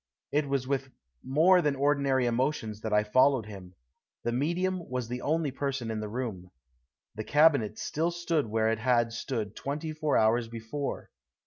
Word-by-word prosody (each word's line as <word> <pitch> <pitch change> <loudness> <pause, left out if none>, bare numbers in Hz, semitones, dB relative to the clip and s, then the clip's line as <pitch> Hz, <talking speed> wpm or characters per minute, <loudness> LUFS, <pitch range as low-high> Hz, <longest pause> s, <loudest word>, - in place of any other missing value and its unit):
It 145 0 0
was 135 -2 -1
with 135 -1 -1 0.3
more 165 +7 +4
than 150 -4 +1
ordinary 140 -2 +2
emotions 120 -3 -1
that 110 - -4
I 105 0 +4
followed 130 +2 +3
him. 95 -4 -11 0.5
The 120 - 0
medium 175 +7 -1
was 125 -2 -3
the 125 +1 -4
only 155 -1 0
person 135 -4 -3
in 110 - -3
the 105 -1 -4
room. 105 -7 -5 0.6
The 110 - -5
cabinet 145 -7 +3
still 160 +3 -1
stood 170 -5 -1
where 110 +1 +1
it 115 0 0
had 120 -1 +2
stood 115 -4 -4
twenty 150 +3 -4
four 155 -1 +1
hours 115 +2 +3
before. 115 +5 -5
130 Hz, 165 wpm, -29 LUFS, 110-145 Hz, 0.6 s, more